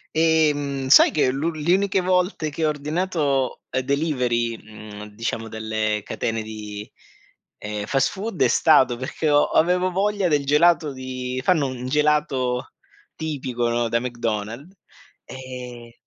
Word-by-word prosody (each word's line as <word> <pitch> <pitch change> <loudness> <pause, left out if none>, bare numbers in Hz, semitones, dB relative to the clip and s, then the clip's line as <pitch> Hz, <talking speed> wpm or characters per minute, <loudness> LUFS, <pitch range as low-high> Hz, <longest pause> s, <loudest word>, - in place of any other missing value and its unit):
Ehm, 145 -4 +1
sai - - +8
che 145 -4 +1
l 135 - -4 0.2
le 155 +3 +1
uniche 195 0 +2
volte 180 -3 0
che 155 +2 -2
ho - - +3
ordinato, 150 -3 -1
ehm, 130 - 0
delivery, 125 -5 0
mhmm, 105 -1 -10
diciamo 115 0 -3
delle 110 -1 -2
catene 115 -1 -3
di, 105 -1 -8 0.7
ehm, 105 0 -5
fast 135 -1 +2
food 200 -1 -5
è - - +5
stato 130 -1 +4
perché 140 +4 -2
ho 145 0 +5
avevo 180 +3 +2
voglia 200 +1 0
del 145 -4 +1
gelato 150 +1 +3
di 130 -1 -5
fanno 160 -4 +2
un 130 -1 -6
un 125 +1 -6
gelato 140 -3 0 0.4
tipico, 130 -6 -3
no, 120 0 0
da 115 - +1
McDonald's 120 - -4 0.5
ehm 125 -2 -9
130 Hz, 140 wpm, -23 LUFS, 120-155 Hz, 0.7 s, sai